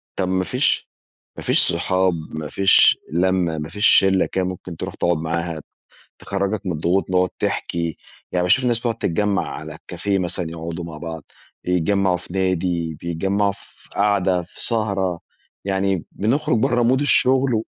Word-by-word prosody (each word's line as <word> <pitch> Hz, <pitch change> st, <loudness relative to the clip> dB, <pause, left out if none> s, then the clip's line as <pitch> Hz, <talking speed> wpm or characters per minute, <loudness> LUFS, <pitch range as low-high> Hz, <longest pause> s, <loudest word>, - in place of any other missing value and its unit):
طَب 95 Hz, -2 st, -1 dB
ما 95 Hz, 0 st, +1 dB
فيش 125 Hz, +8 st, 0 dB, 0.5 s
ما -, -, -7 dB
فيش -, -, +2 dB
صحاب 95 Hz, +2 st, +1 dB, 0.2 s
ما 80 Hz, -1 st, -5 dB
فيش 95 Hz, -1 st, +5 dB
لمّة 90 Hz, -2 st, +1 dB
ما 75 Hz, +1 st, -4 dB
فيش 105 Hz, +5 st, 0 dB
شلّة 95 Hz, -1 st, +5 dB
كده، 95 Hz, -1 st, -1 dB
ممكن 90 Hz, -2 st, -6 dB
تروح -, -, -5 dB
تقعد 85 Hz, -1 st, +1 dB
معاها، 85 Hz, 0 st, -2 dB, 0.6 s
تخرّجك 100 Hz, +1 st, -2 dB
من 90 Hz, -, 0 dB
الضغوط، 90 Hz, +5 st, 0 dB
نقعد 90 Hz, 0 st, +3 dB
تحكي، 85 Hz, -2 st, -2 dB, 0.4 s
يعني 90 Hz, -1 st, +1 dB
باشوف 110 Hz, +9 st, +3 dB
الناس 120 Hz, -2 st, +2 dB
بتقعد 115 Hz, -2 st, -2 dB
تتجمّع 100 Hz, +3 st, 0 dB
على 75 Hz, 0 st, -7 dB
الcafe 90 Hz, +3 st, -11 dB
مثلًا 85 Hz, -1 st, -3 dB
يقعدوا 85 Hz, +1 st, -5 dB
مع 80 Hz, -2 st, -8 dB
بعض، 80 Hz, -2 st, -6 dB, 0.4 s
يتجمّعوا 90 Hz, +1 st, +2 dB
في 90 Hz, -, -12 dB
نادي، 90 Hz, -4 st, 0 dB
بيتجمّعوا 95 Hz, +4 st, 0 dB
في -, -, -21 dB
قعدة، 95 Hz, -3 st, +2 dB
في -, -, -6 dB
سهرة، 100 Hz, -6 st, 0 dB, 0.4 s
يعني 95 Hz, -2 st, 0 dB
بنخرج 130 Hz, +4 st, +1 dB
برّه 120 Hz, +2 st, +2 dB
mood 130 Hz, +2 st, +3 dB
الشغل 130 Hz, -4 st, +3 dB
95 Hz, 155 wpm, -21 LUFS, 85-100 Hz, 0.6 s, فيش